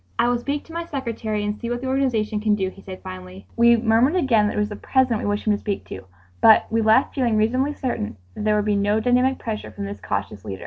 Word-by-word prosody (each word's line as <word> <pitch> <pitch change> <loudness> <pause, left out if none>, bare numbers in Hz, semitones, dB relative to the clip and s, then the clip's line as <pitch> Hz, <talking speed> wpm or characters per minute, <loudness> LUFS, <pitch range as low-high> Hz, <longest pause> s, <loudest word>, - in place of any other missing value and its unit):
"I 235 - +3
will 245 0 +1
speak 285 +4 -3
to 325 - -14
my 335 0 -3
secretary 230 -8 -3
and 210 0 -2
see 235 +2 -6
what 240 0 -2
the - - -5
organization 235 -6 0
can 210 0 +2
do," 190 -2 -1
he 195 - -15
said 185 -1 -10
finally. 185 0 -9
We 235 0 +5
murmured 230 +7 +3
again 235 - +3
that - - -3
it - - 0
was 210 0 0
the 210 - -6
President 255 -3 +1
we - - -3
wished 205 0 -1
him 215 - +3
to 205 - -2
speak 200 -2 -4
to, 95 - -8 0.4
but 220 - +7
we 225 0 +2
left 220 +5 +3
feeling 240 -5 +1
reasonably 255 +7 +1
certain 115 - -3 0.2
that - - -6
there 215 0 +2
would 210 -1 0
be 210 -1 +1
no 205 +2 +1
dynamic 250 +3 +2
pressure 220 -2 -5
from 200 - -6
this 200 +1 -7
cautious 100 0 -4
leader. 100 -3 -6
220 Hz, 265 wpm, -22 LUFS, 205-245 Hz, 0.4 s, but